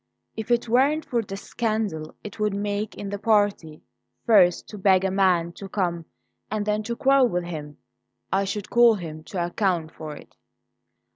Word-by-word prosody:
If 220 +1 -6
it 240 0 +2
weren't 275 +7 +2
for 245 -5 0
the 195 -2 -7
scandal 215 -8 -3
it 210 +1 -9
would 210 -1 0
make 205 +1 -2
in 200 - -6
the 205 - -4
party 205 -7 +1 0.4
first 190 -6 +4
to 210 - -8
beg 190 -1 +4
a 190 - +1
man 185 -3 +2
to 195 - -8
come 175 -4 -2 0.4
and 215 0 -2
then 210 0 0
to 235 - -1
quarrel 270 +1 +4
with 180 -3 -1
him, 150 -4 -7 0.6
I 195 +1 +2
should 200 0 -4
call 235 -1 +6
him 160 -5 -7
to 175 -3 -2
account 175 -3 -1
for 155 -1 -8
it." - - -15
200 Hz, 175 wpm, -24 LUFS, 175-220 Hz, 0.6 s, call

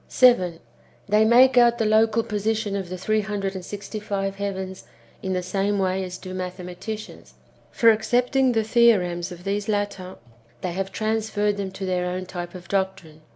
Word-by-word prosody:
7. 185 -10 +4 0.5
They 210 +2 +4
make 250 +3 +6
out 235 0 +5
the 225 - 0
local 220 +1 +3
positions 215 0 -1
of 190 -3 -4
the 185 - -5
three 215 +4 +1
hundred 200 -2 -3
and 190 -2 -6
sixty 205 +3 -6
five 195 -2 -3
heavens 190 -2 -4 0.4
in 190 -1 -2
the 180 0 -1
same 195 +3 0
way 190 0 0
as 180 -1 -6
do 185 0 -8
mathema 180 -1 -5
ticians. 215 +3 -8 0.4
For, 230 -1 +5
accepting 245 +4 +2
the 225 -1 +2
theorems 195 -7 +3
of 175 0 -10
these 205 +2 -2
latter, 200 -3 -2 0.5
they 180 - -2
have 195 +2 -3
transferred 215 -1 -1
them 200 -1 -3
to 195 0 -5
their 180 -1 -1
own 185 +1 -3
type 175 -1 -7
of 180 -1 -10
doctrine. 190 -5 -3
200 Hz, 180 wpm, -24 LUFS, 185-220 Hz, 0.5 s, make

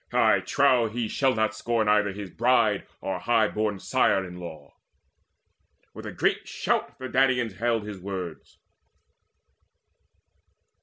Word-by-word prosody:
I - - +4
trow 120 -3 +2
he 115 +1 -3
shall 130 +4 +1
not 110 -2 +1
scorn 110 0 -1
Either 105 -1 +3
his 100 -2 -8
bride 115 -3 +2
or 95 - -3
high 115 -2 +2
born 105 -1 -1
sire 95 0 +1
in 90 -1 -9
law." 85 -3 -10 1.2
With - - -8
a - - -5
great - - 0
shout - - -2
the 130 - -6
Danaans 125 -5 +1
hailed 115 -2 0
his 105 -2 -7
words. 90 -3 -7
110 Hz, 135 wpm, -26 LUFS, 100-120 Hz, 1.2 s, I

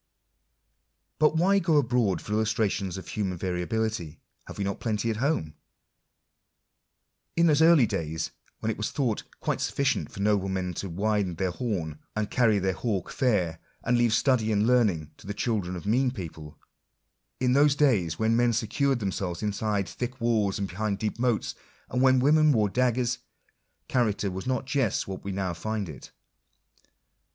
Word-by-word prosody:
But 155 +1 +4
why 195 +4 +4
go 170 -4 +2
abroad 120 -7 +1
for 105 - -4
illustrations 105 -4 0
of 95 - -8
human 95 -4 -2
variability? 90 -1 -2 0.3
have - - -9
we 100 - -1
not 100 0 -3
plenty 115 0 -1
at 110 - -3
home? 120 - 0 1.8
In 170 - +4
those 155 -2 +4
early 160 -6 +7
days 80 -5 -3 0.3
when 110 - 0
it - - -5
was 105 - -2
thought 125 -8 -1
" - - -29
quite - - -1
sufficient 135 -5 0
for 105 - -10
noblemen 95 -3 0
to 95 +3 -5
winde 100 -1 0
their 95 -1 0
horn, 90 - -3 0.2
and 110 -1 -2
carry 115 -4 +3
their 95 -1 0
hawke 100 -3 -2
fair, 90 -10 +1 0.2
and 120 - +2
leave 120 -1 +3
study 115 -1 +2
and 105 0 +2
learning 105 -11 +2
to - - -14
the 100 - -4
children 100 -6 -1
of 90 - -7
mean 125 +5 +2
people"— 80 - -8 0.8
in 125 -1 +2
those 145 +1 +5
days 100 - +2
when 110 +1 +2
men 120 0 +3
secured 130 +5 +1
themselves 95 -2 -3
inside 105 -1 -1
thick 125 +1 -5
walls 110 -4 +1
and 100 - -2
behind 100 +2 -2
deep 110 +2 -3
moats, 120 -3 0 0.4
and 125 - 0
when 130 0 +5
women 155 +3 +5
wore 110 -6 +2
daggers, 125 +1 +1 0.7
character 105 -5 0
was 95 +4 -6
not 130 0 -1
just 130 -5 0
what 95 -1 -6
we 100 - -4
now 95 -2 -2
find 105 +3 -3
it. 75 - -10
110 Hz, 165 wpm, -27 LUFS, 95-125 Hz, 1.8 s, early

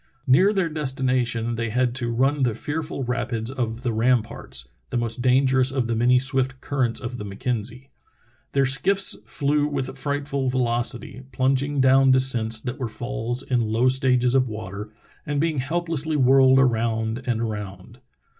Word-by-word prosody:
Near 180 +10 +5
their 190 -4 0
destmation 130 -6 -1
they 115 0 -2
had 125 +1 0
to 120 -2 -2
run 135 +5 +1
the 120 -4 +1
fearful 150 -2 -4
rapids 120 -1 -2
of 120 -2 -4
the 120 -3 -1
Ramparts, 110 - -1 0.2
the - - -2
most 120 +1 -2
dangerous 130 +1 +3
of 130 -2 -1
the 115 0 -1
many 125 +2 +4
swift 130 0 0
currents 130 -5 -1
of 125 0 -6
the - - -5
Mackenzie. 120 +5 -4 0.6
Their 140 - +3
skiiFs 135 - +1
flew 145 +1 +1
with 135 -3 -4
frightful 140 -1 -2
velocity, 120 0 -1
plunging 135 +2 0
down 135 +1 +5
descents 125 -4 +3
that 125 +3 -5
were 130 - -2
falls 120 +2 -3
in 120 -4 -1
low 120 +3 +3
stages 125 -2 +2
of 130 -2 +2
water 105 -1 -7 0.3
and 145 -2 -2
being 155 -2 0
helplessly 160 +1 -1
whirled 130 -1 +5
around 115 -2 +1
and 120 -2 0
around. 105 -5 -6
130 Hz, 155 wpm, -23 LUFS, 115-135 Hz, 0.6 s, Near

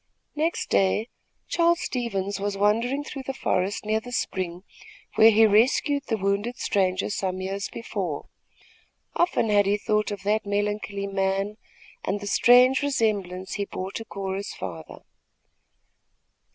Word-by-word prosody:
Next 320 +3 -1
day 205 +4 +2 0.4
Charles 340 0 +3
Stevens 200 -6 -2
was 200 0 -2
wandering 230 +7 +1
through 285 -2 -7
the 270 - -3
forest 190 -1 -1
near 215 +1 +1
the 245 +2 -10
spring 185 -7 -3 0.5
where 220 - +7
he 225 0 +6
rescued 265 +7 +3
the 225 - 0
wounded 200 +5 -1
stranger 185 0 0
some 185 -2 -2
years 195 +1 -3
before. 190 -10 -4 0.9
Often 345 -10 +2
had 205 -1 +4
he 205 +1 +2
thought 210 +1 0
of 205 -2 -6
that 210 +2 +1
melancholy 205 0 -2
man 195 +1 -1 0.5
and 200 +2 -1
the 205 - -7
strange 250 +5 +5
resemblance 205 -9 -1
he 200 -1 -2
bore 190 0 -5
to 225 - -5
Cora's 195 -2 -5
father. - - -8
205 Hz, 140 wpm, -25 LUFS, 195-230 Hz, 0.9 s, where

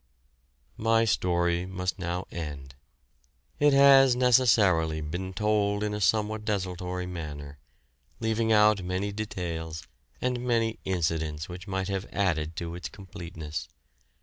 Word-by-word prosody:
My 115 +1 +3
story 85 -3 +1
must 90 0 -3
now 90 +1 -3
end. 70 -5 -6 0.9
It 145 0 +5
has 135 -2 +7
necessarily 105 -11 +4
been 90 +5 -4
told 105 +1 +1
in 105 0 -1
a 105 - -3
somewhat 110 +2 +1
desultory 90 -3 -3
manner, 75 -5 -7 0.6
leaving 110 0 0
out 105 -2 +5
many 95 +3 -2
details 85 -6 -5 0.4
and 125 -1 -1
many 115 -2 0
incidents 80 -4 -1
which 90 +2 -9
might 95 -1 -2
have 100 0 -3
added 80 -5 0
to 85 0 -5
its 85 -3 -6
completeness. 85 -6 -7
95 Hz, 120 wpm, -28 LUFS, 85-110 Hz, 0.9 s, has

